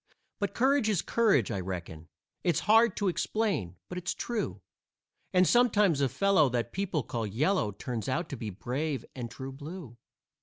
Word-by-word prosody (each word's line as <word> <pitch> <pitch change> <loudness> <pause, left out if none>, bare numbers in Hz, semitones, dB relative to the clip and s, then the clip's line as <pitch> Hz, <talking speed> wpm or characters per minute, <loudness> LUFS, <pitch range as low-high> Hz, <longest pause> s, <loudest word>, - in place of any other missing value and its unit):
But 200 - -2
courage 265 -2 +3
is 200 -6 +1
courage, 205 - +2
I 100 - -2
reckon; 85 -3 -6 0.4
It's 175 -4 +2
hard 225 -1 +4
to 205 - 0
explain, 185 - -1
but 180 - -5
it's 180 +1 -3
true; 235 -3 -3 0.7
And 185 -1 +4
sometimes 210 - +4
a 135 - +3
fellow 190 - +3
that 120 -1 -2
people 185 -7 -1
call 115 -1 -3
yellow 125 - +1
Turns 110 +2 -4
out 160 +6 -1
to 140 - -4
be 115 -4 -5
brave 130 - -3
and 120 -3 -5
true 130 +4 -7
blue. 145 -2 -9
155 Hz, 165 wpm, -29 LUFS, 120-200 Hz, 0.7 s, hard